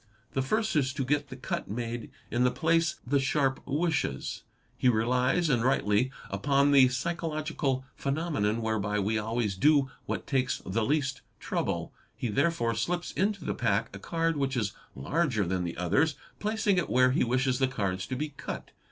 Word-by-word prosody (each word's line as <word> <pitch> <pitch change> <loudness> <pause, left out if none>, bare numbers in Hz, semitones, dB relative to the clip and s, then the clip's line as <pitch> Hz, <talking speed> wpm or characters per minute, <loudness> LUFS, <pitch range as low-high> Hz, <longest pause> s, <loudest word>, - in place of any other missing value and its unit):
The 135 - +1
first 215 +9 0
is 135 -3 +2
to 140 -2 -2
get 145 +2 +1
the 130 - -7
cut 130 - -4
made 115 +2 -4 0.2
in 120 +2 +2
the 125 - +5
place 165 +5 +2
the 140 +3 +2
sharp 135 0 +1
wishes. 155 +2 -1 0.3
He 125 - +3
relies, 125 +8 +2
and 125 -6 +2
rightly, 125 -2 +2 0.2
upon 140 +8 +3
the 135 -2 +7
psychological 155 -2 -2
phenomenon 135 -7 -1
whereby 105 -2 0
we 105 +2 +1
always 110 -2 -1
do 140 +4 +4 0.2
what - - -3
takes 130 -2 +1
the 105 +4 0
least 135 +1 0 0.2
trouble. - - -2 0.2
He 120 - -3
therefore 135 -1 +1
slips 175 +10 -2
into 200 -3 -1
the - - 0
pack 100 -3 0
a - - -7
card 165 - 0
which 135 -2 0
is 105 -5 -1 0.2
larger 125 - 0
than 90 0 -1
the 85 - -5
others, 135 - +2 0.2
placing 210 -3 +1
it 180 - -2
where 125 0 +4
he 130 - +2
wishes 125 +1 +1
the 130 - +3
cards 100 -7 -2
to 130 - -3
be 150 +4 -2
cut. 140 - -7
130 Hz, 175 wpm, -29 LUFS, 115-150 Hz, 0.3 s, the